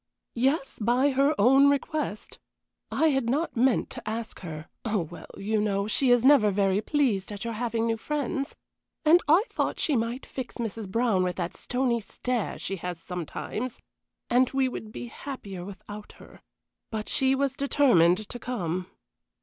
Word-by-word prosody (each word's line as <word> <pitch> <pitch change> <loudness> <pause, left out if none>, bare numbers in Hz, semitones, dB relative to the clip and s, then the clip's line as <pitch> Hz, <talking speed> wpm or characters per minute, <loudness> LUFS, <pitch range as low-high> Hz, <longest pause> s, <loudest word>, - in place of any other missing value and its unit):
"Yes, 270 +4 0
by 250 +6 +3
her 275 +3 +3
own 270 +6 +6
request. 285 -5 -2 0.5
I 320 - +3
had 270 -5 +1
not 300 +7 0
meant 245 +1 +2
to - - -6
ask 225 +1 -5
her 155 -3 -7 0.2
Oh, 215 -4 0
well, 170 +1 -9
you 210 +2 0
know, 200 -1 0
she 255 +4 +2
is 245 0 +5
never 265 -7 +7
very 195 0 +2
pleased 220 -8 0
at 205 -1 -6
your 230 - -2
having 230 0 -1
new 225 -1 0
friends, 275 +1 -3 0.5
and 335 +3 +7
I 330 +7 +6
thought - - -1
she 300 - +1
might 235 +2 -1
fix 260 -2 -6
Mrs. 225 -3 -4
Brown 230 -2 +2
with 180 -1 0
that 175 -2 -3
stony 245 -2 0
stare 240 +1 -3
she 195 - -4
has 175 -1 -5
sometimes, 180 - -5 0.5
and 250 +1 +3
we 270 -1 +1
would 220 -4 -6
be 245 - -6
happier 215 -7 -7
without 205 +2 -9
her; - - -16 0.5
but 220 -2 -4
she 265 -1 +2
was 270 -1 0
determined 215 - +3
to 245 - -6
come." 185 -8 -3
235 Hz, 165 wpm, -27 LUFS, 200-270 Hz, 0.5 s, never